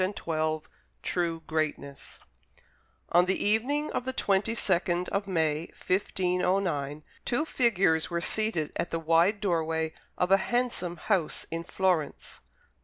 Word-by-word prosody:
Lowell 155 Hz, -1 st, 0 dB, 0.4 s
TRUE 170 Hz, -2 st, -1 dB
GREATNESS 155 Hz, -3 st, -4 dB, 0.9 s
On 175 Hz, +1 st, +6 dB
the 190 Hz, +1 st, +1 dB
evening 260 Hz, +9 st, +1 dB
of -, -, -2 dB
the 260 Hz, +1 st, -3 dB
twenty 205 Hz, 0 st, +1 dB
second 180 Hz, -3 st, +1 dB
of 200 Hz, 0 st, -1 dB
May, 160 Hz, -3 st, 0 dB
1509, 180 Hz, -5 st, 0 dB, 0.2 s
two 260 Hz, +6 st, 0 dB
figures 195 Hz, -, +2 dB
were 170 Hz, -1 st, -1 dB
seated 185 Hz, -4 st, 0 dB
at 170 Hz, -, -1 dB
the 165 Hz, -, -1 dB
wide 165 Hz, +5 st, +3 dB
doorway 160 Hz, -4 st, 0 dB, 0.2 s
of 180 Hz, +1 st, +1 dB
a 195 Hz, -, +8 dB
handsome 215 Hz, -6 st, -1 dB
house 175 Hz, -2 st, 0 dB
in 165 Hz, 0 st, -3 dB
Florence. 180 Hz, -3 st, -1 dB
180 Hz, 125 wpm, -28 LUFS, 160-200 Hz, 0.9 s, a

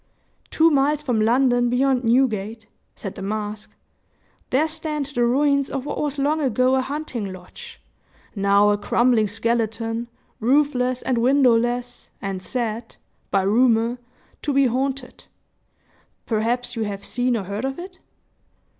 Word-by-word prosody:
"Two 325 Hz, +1 st, +4 dB
miles 295 Hz, +1 st, +2 dB
from 245 Hz, -6 st, 0 dB
London 245 Hz, +1 st, +3 dB
beyond 255 Hz, +1 st, +2 dB
Newgate," 225 Hz, -3 st, +1 dB, 0.3 s
said 195 Hz, -, -6 dB
the -, -, -9 dB
mask. 210 Hz, +1 st, -4 dB, 0.8 s
"There 290 Hz, +5 st, +2 dB
stand 310 Hz, -2 st, -3 dB
the 270 Hz, -4 st, -1 dB
ruins 280 Hz, +3 st, +2 dB
of 270 Hz, -1 st, -4 dB
what -, -, -3 dB
was 295 Hz, -1 st, -2 dB
long 295 Hz, +3 st, +1 dB
ago 255 Hz, -1 st, +2 dB
a 260 Hz, -, +2 dB
hunting 260 Hz, -7 st, -4 dB
lodge, 180 Hz, -1 st, -12 dB, 0.6 s
now 200 Hz, +1 st, +4 dB
a 205 Hz, -, 0 dB
crumbling 235 Hz, 0 st, +2 dB
skeleton, 225 Hz, +1 st, -1 dB, 0.3 s
roofless 255 Hz, 0 st, +1 dB
and 250 Hz, -3 st, 0 dB
windowless, 245 Hz, -1 st, +2 dB
and 195 Hz, -2 st, -4 dB
said, 230 Hz, +1 st, -4 dB, 0.3 s
by 195 Hz, -1 st, +2 dB
rumor, 230 Hz, +3 st, +2 dB, 0.4 s
to 295 Hz, -, -1 dB
be 275 Hz, 0 st, +4 dB
haunted. 260 Hz, +1 st, -2 dB, 1.0 s
Perhaps 235 Hz, +3 st, -1 dB
you 230 Hz, -, -3 dB
have 200 Hz, -1 st, -5 dB
seen 245 Hz, 0 st, 0 dB
or 205 Hz, -, -3 dB
heard 200 Hz, +4 st, -5 dB
of 270 Hz, 0 st, -3 dB
it?" 365 Hz, +1 st, -9 dB
245 Hz, 135 wpm, -22 LUFS, 220-270 Hz, 1.0 s, Two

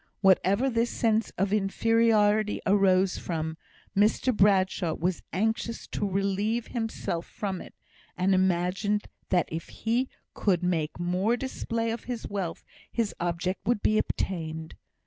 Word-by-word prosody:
Whatever 195 Hz, +5 st, +4 dB
this 235 Hz, -2 st, +1 dB
sense 225 Hz, -1 st, +1 dB
of 195 Hz, +2 st, +1 dB
inferiority 215 Hz, 0 st, +3 dB
arose 190 Hz, -1 st, +3 dB
from, 160 Hz, -2 st, -3 dB, 0.4 s
Mr 215 Hz, +4 st, +3 dB
Bradshaw 190 Hz, -4 st, +3 dB
was 175 Hz, +1 st, -1 dB
anxious 220 Hz, +4 st, -1 dB
to 205 Hz, -, -2 dB
relieve 200 Hz, +4 st, 0 dB
himself 225 Hz, -7 st, -4 dB
of 190 Hz, -3 st, -1 dB
it, -, -, -12 dB, 0.4 s
and 185 Hz, +2 st, +3 dB
imagined 185 Hz, +3 st, +1 dB, 0.2 s
that 180 Hz, -2 st, +2 dB
if 160 Hz, 0 st, -5 dB
he 240 Hz, +4 st, -1 dB, 0.2 s
could 180 Hz, -4 st, +1 dB
make 165 Hz, -3 st, -1 dB
more 185 Hz, +7 st, +1 dB
display 230 Hz, -3 st, -2 dB
of 230 Hz, -, -5 dB
his 245 Hz, -2 st, -4 dB
wealth 190 Hz, -5 st, -4 dB, 0.3 s
his 230 Hz, -4 st, -1 dB
object 175 Hz, +2 st, -2 dB
would 235 Hz, -3 st, +1 dB
be 215 Hz, 0 st, +3 dB
obtained. 160 Hz, -3 st, -3 dB
195 Hz, 130 wpm, -28 LUFS, 180-225 Hz, 0.4 s, Whatever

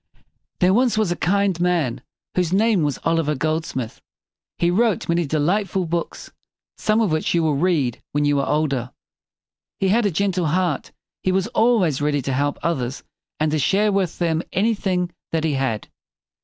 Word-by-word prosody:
There 185 Hz, +1 st, +5 dB
was 245 Hz, 0 st, +2 dB
once 215 Hz, -5 st, +1 dB
a -, -, 0 dB
kind 195 Hz, 0 st, +1 dB
man 170 Hz, -8 st, 0 dB, 0.3 s
whose 180 Hz, -2 st, 0 dB
name 210 Hz, 0 st, +3 dB
was 145 Hz, -2 st, 0 dB
Oliver 165 Hz, -2 st, +1 dB
Gold 155 Hz, +3 st, -1 dB
smith. 120 Hz, -4 st, -5 dB, 0.6 s
He 170 Hz, 0 st, +2 dB
wrote 215 Hz, +1 st, +1 dB
many 170 Hz, -1 st, +1 dB
de 155 Hz, -, 0 dB
light 190 Hz, +7 st, +1 dB
ful 190 Hz, 0 st, -1 dB
books, 170 Hz, +1 st, -4 dB, 0.4 s
some 215 Hz, +1 st, +1 dB
of 210 Hz, -7 st, +1 dB
which 155 Hz, +2 st, 0 dB
you 170 Hz, -, +2 dB
will 155 Hz, -2 st, +2 dB
read 145 Hz, -6 st, 0 dB
when 145 Hz, 0 st, +1 dB
you 145 Hz, -1 st, +2 dB
are 140 Hz, -, -1 dB
older. 140 Hz, -5 st, 0 dB, 0.9 s
He 190 Hz, -, +1 dB
had 220 Hz, +2 st, +3 dB
a -, -, +2 dB
gentle 185 Hz, -1 st, 0 dB
heart. 175 Hz, -2 st, 0 dB, 0.3 s
He 185 Hz, -, +1 dB
was 190 Hz, 0 st, +1 dB
always 200 Hz, -, +2 dB
ready 145 Hz, -2 st, 0 dB
to 135 Hz, -, -2 dB
help 145 Hz, +2 st, 0 dB
others 135 Hz, -6 st, -2 dB, 0.4 s
and 155 Hz, 0 st, +1 dB
to 155 Hz, -, +1 dB
share 205 Hz, +9 st, +2 dB
with 195 Hz, -4 st, 0 dB
them 165 Hz, -2 st, 0 dB
anything 190 Hz, -4 st, 0 dB, 0.2 s
that 160 Hz, -1 st, 0 dB
he 160 Hz, -2 st, +1 dB
had. 130 Hz, -6 st, -1 dB
170 Hz, 185 wpm, -22 LUFS, 150-190 Hz, 0.9 s, There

